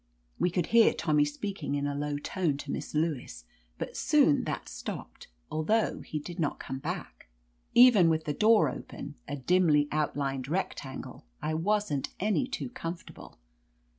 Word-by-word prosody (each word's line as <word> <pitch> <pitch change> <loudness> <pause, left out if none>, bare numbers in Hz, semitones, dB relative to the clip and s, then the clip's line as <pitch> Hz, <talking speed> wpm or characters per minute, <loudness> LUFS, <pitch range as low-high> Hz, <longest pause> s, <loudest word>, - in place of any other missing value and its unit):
We - - +3
could 175 -1 0
hear 230 -1 +6
Tommy 150 -2 +2
speaking 150 0 -4
in 145 0 -1
a 145 - -1
low 145 0 -2
tone 150 0 -1
to 140 0 -6
Missf - - -5
Lewis, 140 - -2 0.3
but - - -5
soon 290 - +3
that - - -4
stopped, - - -7 0.2
al 155 - -1
though 220 +7 +1
he 155 - -5
did 170 +4 -7
not 150 -3 0
come 135 - -5
back. - - -6 0.5
Even 235 -8 +8
with 160 -1 +1
the 150 - -2
door 215 -2 +5
open, 130 - -7
a - - -3
dimly 150 0 +3
outlined 140 -3 -1
rectangle, 145 - -4
I 155 - -2
wasn't 170 -3 0
any 215 +6 +1
too 265 -1 -4
comfortable. 165 - -8
155 Hz, 160 wpm, -29 LUFS, 145-190 Hz, 0.5 s, Even